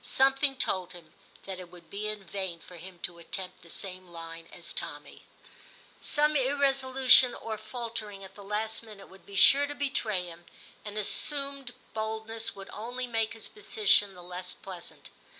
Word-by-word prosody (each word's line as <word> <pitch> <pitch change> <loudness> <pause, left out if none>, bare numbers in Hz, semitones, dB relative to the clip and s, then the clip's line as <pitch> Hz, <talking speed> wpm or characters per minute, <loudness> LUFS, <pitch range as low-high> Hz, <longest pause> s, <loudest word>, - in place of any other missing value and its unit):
Something 270 +1 +3
told 185 -8 -1
him 175 -2 -13 0.3
that 190 -1 -6
it 180 -2 -9
would 175 -2 -16
be 205 +1 -3
in 215 -2 -4
vain 190 -2 -4
for 180 +1 -13
him 180 +2 -10
to 170 -1 -4
attempt 185 +2 -7
the 170 - -16
same 185 0 -7
line 165 -1 -9
as - - -6
Tommy; - - -5 0.8
some 300 0 +3
irresolution 265 -2 +6
or 225 -1 -4
faltering 215 -2 -6
at 190 0 -11
the 205 - -12
last 215 +2 -2
minute 215 -3 -12
would 190 - -17
be 200 - -10
sure 280 +8 +8
to 290 - -5
betray 230 -10 0
him, 170 0 -11 0.4
and 210 0 -7
his 210 - +3
assumed 275 -3 +2 0.2
boldness 220 +1 -1
would 195 -1 -10
only 245 +4 -4
make 225 -2 -1
his 225 - -5
position 420 - +2
the 180 - -11
less 180 +1 -5
pleasant. 180 -3 -10
215 Hz, 170 wpm, -29 LUFS, 185-255 Hz, 0.8 s, sure